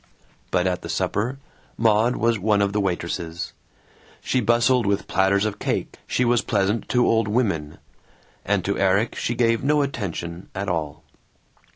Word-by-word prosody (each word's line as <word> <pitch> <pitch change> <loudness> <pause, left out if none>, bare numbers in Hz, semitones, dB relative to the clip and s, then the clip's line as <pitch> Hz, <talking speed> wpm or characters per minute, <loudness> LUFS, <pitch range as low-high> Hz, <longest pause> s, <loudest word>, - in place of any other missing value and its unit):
But 90 - +1
at 90 -1 0
the - - -8
supper 115 +7 -1 0.4
Maud 115 +2 +3
was 115 -2 +1
one 100 +1 +2
of 100 0 -1
the 105 - +1
waitresses; 85 -2 -3 0.7
she 130 - 0
bustled 120 +1 +3
with 100 0 0
platters 95 +2 +2
of 105 -1 -3
cake, - - -2
she 125 - +1
was 120 0 +3
pleasant 105 +1 0
to 125 -1 +3
old 115 -1 +2
women; 100 -10 -1 0.7
and 100 -3 0
to 100 - -1
Erik 100 +4 +2
she 120 - -2
gave 115 0 +2
no 145 +1 +3
attention 90 - -5
at 100 +1 -3
all. 75 -4 -3
105 Hz, 160 wpm, -23 LUFS, 95-115 Hz, 0.7 s, Maud